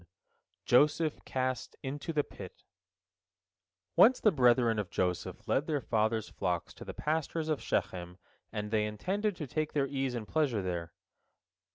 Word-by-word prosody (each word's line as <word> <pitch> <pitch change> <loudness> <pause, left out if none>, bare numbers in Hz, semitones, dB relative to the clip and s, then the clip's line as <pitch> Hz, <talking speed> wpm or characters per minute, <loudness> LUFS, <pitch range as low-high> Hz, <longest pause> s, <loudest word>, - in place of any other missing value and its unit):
JOSEPH 150 +4 +3
CAST 130 -1 -2
INTO 145 +5 -4
THE 150 -2 +1
PIT - - -11 1.3
Once 250 +4 +7
the 215 - +5
brethren 120 - +4
of 100 -4 -3
Joseph 90 -1 -2
led 145 - +1
their 150 -3 +1
father's 110 -2 0
flocks 90 -3 -2
to - - -10
the - - -7
pastures 160 +1 -1
of 155 - 0
Shechem, 90 0 -2 0.3
and 105 0 -4
they 105 -1 +2
intended 195 - -1
to 155 - -5
take 155 +3 -2
their 145 -2 +2
ease 135 -2 -2
and 110 -3 -4
pleasure 135 -10 +1
there. 85 -2 -3
130 Hz, 150 wpm, -31 LUFS, 105-155 Hz, 1.3 s, Once